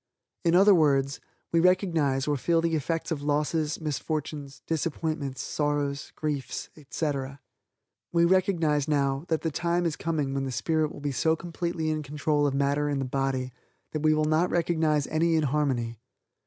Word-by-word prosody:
In 170 -1 +3
other 200 +3 +7
words, 140 -5 +2 0.3
we 170 - +3
recognize, 165 -7 +2
or 145 - +2
feel 165 +5 +2
the 165 0 0
effects 160 +3 -1
of 150 -3 -2
losses, 150 +2 0
misfortunes, 150 -1 -4
disappointments, 155 -3 -2
sorrows, 145 -1 -1
griefs, 150 -4 -3
etc. 140 -2 -3 0.7
We 170 0 +4
recognize 170 -5 +2
now, 140 -1 +1
that 160 -2 0
the 160 - -1
time 175 +3 0
is 165 -3 0
coming 155 -5 -2
when 135 0 -1
the 135 - -3
spirit 155 +6 0
will - - -10
be 145 0 -1
so 160 +4 +2
completely 170 -1 -3
in 155 0 -1
control 145 0 0
of 135 - -1
matter 140 +1 +1
in 145 - 0
the 135 - -1
body, 130 -1 -1 0.4
that 155 - -3
we 155 0 +4
will 155 0 +1
not 155 +3 +2
recognize 160 -4 +1
any 165 +1 +1
inharmony. 135 -7 0
150 Hz, 165 wpm, -27 LUFS, 140-165 Hz, 0.7 s, other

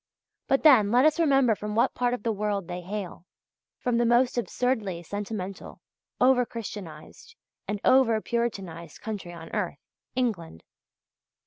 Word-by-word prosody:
But 270 0 +2
then, 250 -10 +7
let 245 +5 +4
us 310 +2 +3
remember 270 -7 +4
from 210 0 -5
what 230 - +2
part 245 0 0
of 205 - -11
the 230 - +1
world 205 -3 -2
they 180 0 -5
hail 185 -1 -6 0.5
from 240 -1 0
the 240 - +3
most 240 +2 +3
absurdly 225 -7 -1
sentimental, 200 0 -6 0.4
over 255 0 +5
Christianized, 210 - -9 0.3
and 205 0 -2
over 255 -4 +5
Puritanized 195 -9 -4
country 205 -5 -6
on 165 -1 -11
earth - - -2 0.4
England. 195 - -2
220 Hz, 140 wpm, -27 LUFS, 190-250 Hz, 0.5 s, then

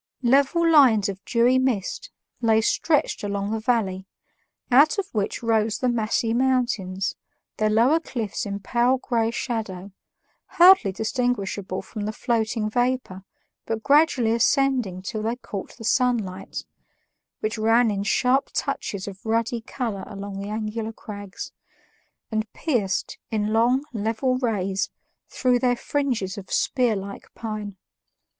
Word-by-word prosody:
Level 280 +7 +3
lines 250 -10 +5
of 195 0 -7
dewy 245 +2 +3
mist 260 - -1 0.3
lay 225 -2 +4
stretched 290 +5 +1
along 200 0 -2
the 225 - -1
valley, 210 -5 0 0.6
out 285 +9 +6
of 400 - 0
which 210 +2 -2
rose 225 -1 +1
the 255 - 0
massy 225 -1 0
mountains, 240 -7 0 0.4
their 215 0 +2
lower 240 +9 +4
cliffs 225 - -4
in 200 0 -4
pale 240 +6 +2
gray 230 -3 0
shadow, 215 -6 -4 0.7
hardly 355 - +7
distinguishable 205 -3 -2
from 210 -3 -6
the 215 - -2
floating 220 -1 -1
vapor 245 -5 -1 0.4
but 225 -1 -3
gradually 280 -6 +4
ascending 235 -5 +1
till 215 +2 -4
they 225 +2 -1
caught 205 -5 -8
the 230 - -10
sunlight, 225 -6 0 0.8
which 215 0 -2
ran 225 +1 +4
in 200 -1 -2
sharp 250 +6 +2
touches 200 -1 -3
of 195 -1 -9
ruddy 230 +1 0
color 225 -4 -4
along 200 -1 -7
the 200 +1 -5
angular 220 +1 -3
crags, 205 -3 -8 0.8
and 220 -1 -2
pierced, 235 - -1
in 215 -1 -1
long, 245 +4 +3
level 230 +4 0
rays, 195 -6 -1 0.4
through 250 -2 +1
their 245 0 +2
fringes 235 -8 -2
of 190 - -11
spearlike 205 -6 -1
pine. 210 -3 -5
225 Hz, 130 wpm, -24 LUFS, 205-250 Hz, 0.8 s, hardly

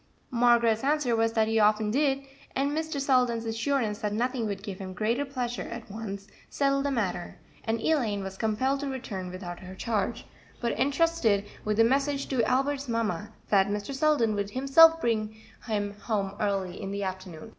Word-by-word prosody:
Margaret's 235 -2 +3
answer 280 -4 +2
was 225 0 +1
that 220 -1 +2
he 225 0 +2
often 210 0 +3
did, 275 +1 +1 0.3
and 275 +2 +1
Mr. 315 -1 -2
Selden's 250 -4 +2
assurance 225 -1 -1
that 210 -1 -2
nothing 240 +1 -1
would 200 -1 -4
give 200 -3 -6
him 190 -1 -6
greater 230 +8 0
pleasure 250 -3 -3
at 235 -3 -7
once 200 -2 -6 0.2
settled 275 0 +1
the - - +1
matter, 200 -9 -2 0.3
and 225 +1 0
Elaine 225 -9 +1
was 190 0 -6
compelled 230 +7 0
to 285 - -3
return 230 -9 -5
without 180 -1 -7
her 185 0 -10
charge, 210 0 -2 0.3
but 235 -1 0
entrusted 275 -6 +2 0.2
with 210 0 -1
the 225 - +6
message 275 +3 +1
to 255 -4 +1
Albert's 275 +1 0
mamma 215 -4 -1 0.2
that 195 -2 +4
Mr. 205 +6 -3
Selden 270 -6 +2
would 200 -1 -2
himself 275 +7 +6
bring 220 -4 -1 0.3
him 205 -2 -1
home 200 -2 -2
early 195 -3 -1
in 195 - -4
the 200 0 -3
afternoon. 185 0 -6
225 Hz, 175 wpm, -28 LUFS, 205-270 Hz, 0.3 s, the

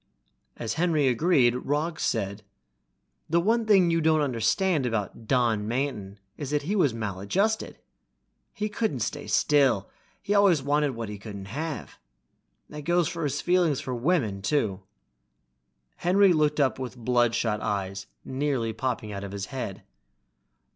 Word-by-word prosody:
As 115 - -3
Henry 160 -5 +2
agreed, 130 -1 +3
Roggs 150 +6 -2
said, 100 -2 -1 0.9
"The 170 +2 +3
one 225 +5 +1
thing 190 -5 +5
you 165 0 +2
don't 155 0 +3
understand 145 - +1
about 115 0 -3
Don 115 -5 +1
Manton 115 -5 -3 0.2
is 145 - -5
that 150 0 0
he 195 +8 -1
was 165 -10 +3
maladjusted. 115 - -1 0.7
He 210 - -3
couldn't 210 - -2
stay 145 +7 -3
still, 135 -9 +2 0.3
he 205 - -2
always 195 -8 +4
wanted 145 -1 +1
what 115 -1 -4
he 105 -1 -7
couldn't 100 -2 -8
have. 150 -4 -5 0.7
That 150 0 -8
goes 175 +2 +2
for 165 -1 -4
his 145 0 -1
feelings 175 -6 +2
for 130 - -4
women, 120 - 0
too." 100 -4 0 1.2
Henry 190 +1 +4
looked 150 -1 +1
up 135 -2 +2
with 130 -1 -6
bloodshot 120 -2 +1
eyes 95 -1 -3 0.2
nearly 130 -4 -1
popping 115 -2 -3
out 100 -1 -5
of 100 0 -7
his 100 -1 -4
head. 125 -7 -5
135 Hz, 145 wpm, -26 LUFS, 110-165 Hz, 1.2 s, thing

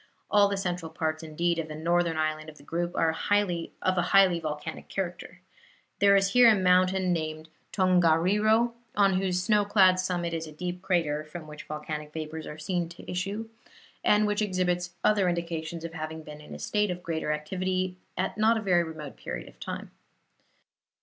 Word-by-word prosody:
All 205 -1 +6
the 200 0 -2
central 180 -3 -3
parts, 160 -1 -2
indeed, 165 +2 -1
of 160 - -3
the 155 - -7
northern 170 +1 +1
island 155 0 -1
of 155 - -13
the - - -16
group 170 +3 -3
are 165 - +3
of 185 +1 0
a - - +4
highly 190 -2 +4
volcanic 155 0 -5
character. 180 -1 -5 0.6
There 200 0 +6
is 195 0 +3
here 245 0 +7
a 220 - +6
mountain 185 0 +3
named 155 -1 -4 0.2
Tongariro, 185 +5 +3 0.2
on 195 -2 +3
whose 180 -1 0
snow 210 +1 +3
clad 190 -3 +5
summit 175 -2 -1
is 165 -1 -3
a - - -9
deep 180 +3 -5
crater, 165 -5 0
from 155 +1 -9
which 150 0 -10
volcanic 150 0 -6
vapors 160 0 -5
are 150 - -7
seen 170 +1 -2
to 175 - -10
issue, 200 +5 -3 0.6
and 210 0 +4
which 210 0 0
exhibits 180 -3 -1
other 200 -4 +3
indications 170 -1 -3
of 165 -1 -6
having 160 0 -6
been 150 -1 -10
in 150 - -10
a - - -7
state 210 -1 0
of 180 0 -4
greater 160 -2 -2
activity 185 +4 -2 0.2
at - - -2
a - - -8
not 225 +1 +4
very 175 -3 +3
remote 155 -3 -8
period - - -6
of - - -16
time. - - -6
175 Hz, 185 wpm, -28 LUFS, 160-190 Hz, 0.6 s, here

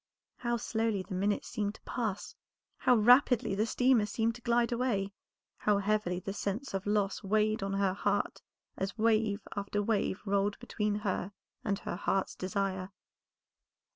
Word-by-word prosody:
How 240 -1 -1
slowly 220 -3 -1
the 190 - -8
minutes 200 +3 0
seemed 210 -2 -2
to - - -16
pass, 215 -5 -3 0.4
how 250 - +4
rapidly 245 -1 +5
the 210 +3 +1
steamer 245 -3 +3
seemed 225 +1 0
to 240 - -12
glide 235 0 +2
away, 225 -5 0 0.4
how 210 -1 +2
heavily 200 -3 0
the 195 +2 -5
sense 205 +6 -3
of 195 +1 -3
loss 205 -1 +1
weighed 215 +1 +1
on 195 0 -2
her 195 -1 +2
heart - - -1 0.3
as 190 +4 -3
wave 215 -2 +2
after 200 0 -2
wave 205 -3 0
rolled 200 0 +1
between 210 -1 -2
her 195 0 -1 0.3
and 200 -2 0
her 175 - -5
heart's 195 0 0
desire. 190 -1 -2
205 Hz, 155 wpm, -31 LUFS, 195-225 Hz, 0.4 s, rapidly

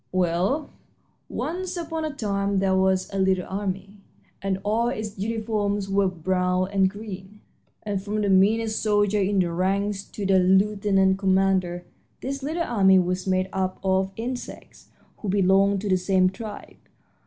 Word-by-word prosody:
"Well, 185 - 0 0.6
once 365 +2 -4
upon 325 -2 -3
a 310 - -2
time 200 -3 -1
there 190 0 +2
was 190 0 +2
a 195 - -1
little 190 -1 +2
army 195 +1 -4 0.4
and 195 -1 -1
all 225 +3 +1
its 215 -4 -4
uniforms 210 -2 -1
were 195 0 +3
brown 180 +1 0
and 195 -1 +3
green, 205 0 -9 0.4
and 205 -2 -2
from 210 +2 -2
the 205 - 0
meanest 215 +3 +3
soldier 205 -1 +2
in 195 +1 +1
the 180 -2 +2
ranks 195 +3 -1
to 205 - -6
the 190 -1 +4
lieutenant 195 0 +3
commander 190 -2 +1 0.4
this 275 +2 -4
little 320 +5 -2
army 195 - +4
was 180 +1 0
made 185 0 +1
up 185 -1 -1
of 190 0 +1
insects 245 +2 -7 0.3
who 210 - -5
belonged 195 0 +3
to 205 - -3
the 185 - +4
same 185 0 +2
tribe. 210 +1 -9
195 Hz, 155 wpm, -24 LUFS, 190-210 Hz, 0.6 s, the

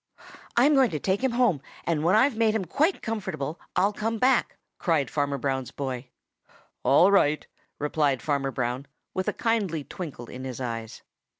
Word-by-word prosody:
"I'm 275 +5 +6
going 265 -4 +5
to 155 - -3
take 190 - 0
him 260 -2 +2
home, 235 - +2 0.2
and 160 -3 0
when 175 +5 +4
I've 255 +3 +4
made 220 -1 +2
him 205 -4 0
quite 310 - +1
comfortable, 190 -9 -3 0.2
I'll 200 +3 +3
come 225 +2 -2
back," 255 +2 +2 0.2
cried 160 -7 +1
Farmer 145 -1 0
Brown's 130 -2 -2
boy. 130 -2 -4 0.7
"All 145 +9 +5
right," 155 -6 +3 0.3
replied 145 -4 0
Farmer 140 -2 0
Brown, 125 +1 -2 0.3
with 185 - -2
a - - +3
kindly 205 -10 0
twinkle 145 -7 -7
in 125 +2 -8
his 130 -2 -5
eyes. 115 -3 -5
160 Hz, 170 wpm, -26 LUFS, 135-220 Hz, 0.7 s, I'm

